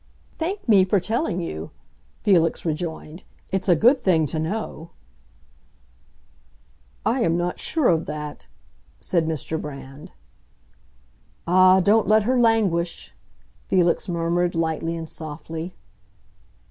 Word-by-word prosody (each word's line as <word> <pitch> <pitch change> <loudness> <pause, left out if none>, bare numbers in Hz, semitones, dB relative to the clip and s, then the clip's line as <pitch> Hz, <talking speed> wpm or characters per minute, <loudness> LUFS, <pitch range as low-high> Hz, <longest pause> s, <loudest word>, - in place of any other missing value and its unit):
"Thank 365 +3 -3
me 200 -4 +6
for 190 +2 +2
telling 215 - -2
you," 80 - -5 0.5
Felix 170 -5 +2
rejoined. 160 +1 -4 0.3
"It's 190 0 -1
a 175 - +6
good 245 - +4
thing 175 -9 +2
to 155 +2 -3
know." 165 -1 -4 2.2
"I 235 +4 +1
am 170 -6 +2
not 175 0 -2
sure 310 -6 +1
of 165 -1 +2
that," 150 -1 -6 0.5
said 170 -3 0
Mr. 160 0 -3
Brand. 140 -1 -9 1.3
"Ah, 185 +2 +5
don't 210 +3 +3
let 215 0 +4
her 250 +3 +1
languish!" 185 - +1 0.5
Felix 180 0 +1
murmured, 175 +1 0
lightly 165 0 -1
and 165 -1 -6
softly. 160 +3 -7
175 Hz, 115 wpm, -23 LUFS, 160-200 Hz, 2.2 s, me